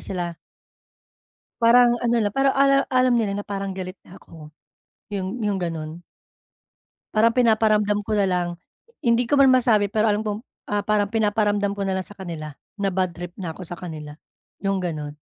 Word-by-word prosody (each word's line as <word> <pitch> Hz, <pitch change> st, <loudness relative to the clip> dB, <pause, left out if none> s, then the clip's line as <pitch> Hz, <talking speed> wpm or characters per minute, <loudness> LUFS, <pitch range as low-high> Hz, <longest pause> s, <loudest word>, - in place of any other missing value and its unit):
sila. 175 Hz, -3 st, -4 dB, 1.2 s
Parang 240 Hz, +1 st, +6 dB
ano 240 Hz, 0 st, +2 dB
na, 210 Hz, -2 st, +1 dB
parang 270 Hz, 0 st, +3 dB
ala 275 Hz, 0 st, +4 dB
alam 255 Hz, -1 st, +4 dB
nila 220 Hz, -4 st, +1 dB
na 205 Hz, -, -7 dB
parang 195 Hz, -1 st, -3 dB
galit 185 Hz, 0 st, -6 dB
na 190 Hz, -, -14 dB
ako. 155 Hz, -2 st, -14 dB, 0.6 s
Yung 200 Hz, +4 st, -3 dB
yung 205 Hz, -2 st, 0 dB
gano'n. 165 Hz, -2 st, -4 dB, 1.1 s
Parang 225 Hz, +2 st, +4 dB
pinaparamdam 215 Hz, -3 st, +3 dB
ko -, -, -2 dB
na 200 Hz, -, +3 dB
lang, 180 Hz, -2 st, 0 dB, 0.6 s
hindi 235 Hz, 0 st, +3 dB
ko 285 Hz, -, +3 dB
man 270 Hz, -1 st, +6 dB
masabi, 220 Hz, -5 st, +3 dB
pero 215 Hz, +1 st, +2 dB
alam 210 Hz, +1 st, 0 dB
kong, 210 Hz, -1 st, -2 dB, 0.3 s
ah, 205 Hz, 0 st, +1 dB
parang 210 Hz, -1 st, +1 dB
pinaparamdam 205 Hz, -2 st, +1 dB
ko 200 Hz, -, -3 dB
na 190 Hz, -, 0 dB
lang 185 Hz, -, -3 dB
sa 205 Hz, -, -13 dB
kanila, 165 Hz, -5 st, -6 dB, 0.3 s
na 200 Hz, -1 st, +1 dB
badtrip 175 Hz, -2 st, -3 dB
na 175 Hz, -4 st, -5 dB
ako 185 Hz, -, -11 dB
sa 175 Hz, -, -6 dB
kanila, 155 Hz, -4 st, -8 dB, 0.5 s
yung 195 Hz, -1 st, +1 dB
gano'n. 150 Hz, -4 st, -4 dB
205 Hz, 175 wpm, -23 LUFS, 180-225 Hz, 1.2 s, Parang